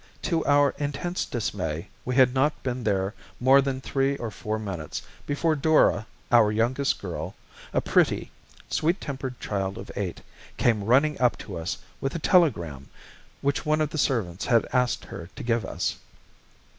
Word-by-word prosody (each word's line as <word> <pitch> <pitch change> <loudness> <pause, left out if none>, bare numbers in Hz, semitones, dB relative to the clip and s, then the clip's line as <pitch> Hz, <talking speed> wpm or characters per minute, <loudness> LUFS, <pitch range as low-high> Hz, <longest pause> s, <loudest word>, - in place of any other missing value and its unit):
To 165 -3 +1
our 145 0 +5
intense 150 +5 -2
dismay, 90 -7 -3 0.2
we 125 - -1
had 130 -2 +6
not 150 +3 +1
been 125 -2 -2
there 100 -1 0 0.3
more 135 +2 +6
than 135 -1 -2
three 135 +1 0
or 115 -4 -4
four 105 +1 -3
minutes, 95 -8 -5 0.2
before 155 +3 +1
Dora, 140 -8 +3 0.2
our 115 -3 +6
youngest 120 +6 +1
girl, 90 0 -5 0.4
a - - +1
pretty, - - +2 0.4
sweet 170 +5 +1
tempered 130 -3 -5
child 95 0 -2
of - - -8
eight, 95 -4 -3 0.4
came 110 -4 +2
running 140 +6 +3
up 125 -1 +3
to 100 - -7
us 80 -1 -3 0.2
with 135 - -2
a - - +1
telegram, 85 - +2 0.5
which 140 0 0
one 155 0 +2
of 155 -1 0
the 155 - -3
servants 105 -10 0
had 115 -2 +4
asked 125 -1 +1
her 85 +1 -8
to - - -7
give 115 -2 +1
us. - - -2
125 Hz, 165 wpm, -26 LUFS, 100-140 Hz, 0.5 s, had